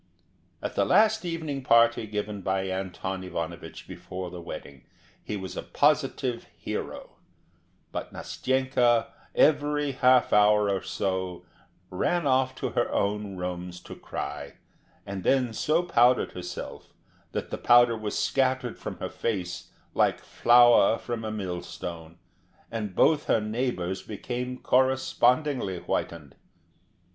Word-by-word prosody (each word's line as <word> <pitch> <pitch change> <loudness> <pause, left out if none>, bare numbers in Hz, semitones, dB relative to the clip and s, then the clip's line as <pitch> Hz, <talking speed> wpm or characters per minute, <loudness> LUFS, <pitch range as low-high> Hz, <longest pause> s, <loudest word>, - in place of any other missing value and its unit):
At - - -3
the - - +2
last 220 -1 +4
evening 160 -5 -3
party 115 -2 +4
given 105 -1 -4
by 95 +1 0
Anton 95 0 -4
Ivanovich 85 -2 -6
before 90 0 -7
the 90 - -8
wedding, 70 -5 -9 0.4
he 105 - -4
was 95 -1 -7
a - - -3
positive 135 -4 +1
hero; - - -6 0.7
but - - -5
Nastenka 130 -3 +1 0.3
every 145 -1 +3
half 130 -1 +4
hour 105 0 +5
or 95 -1 -1
so 95 -2 -3 0.5
ran 170 - 0
off 130 -1 +2
to - - -3
her - - 0
own 100 -1 -1
rooms 90 0 -5
to - - -10
cry, 70 0 -6 0.5
and 100 -2 -5
then 130 -4 +2
so 155 +9 +1
powdered 125 -7 +3
herself, 90 0 -8 0.4
that - - -4
the - - -4
powder 120 -1 +6
was 110 -2 -4
scattered 130 -2 0
from - - -6
her - - -4
face 90 -6 -3 0.2
like - - +2
flour 120 -2 +5
from 120 -2 -5
a 110 - -3
millstone, 90 -4 -6 0.5
and 105 -5 -4
both 150 0 +4
her - - +3
neighbours 105 -4 -2
became 125 +4 -5
correspondingly 130 - +2
whitened. 80 -4 -4
110 Hz, 125 wpm, -27 LUFS, 95-130 Hz, 0.7 s, powder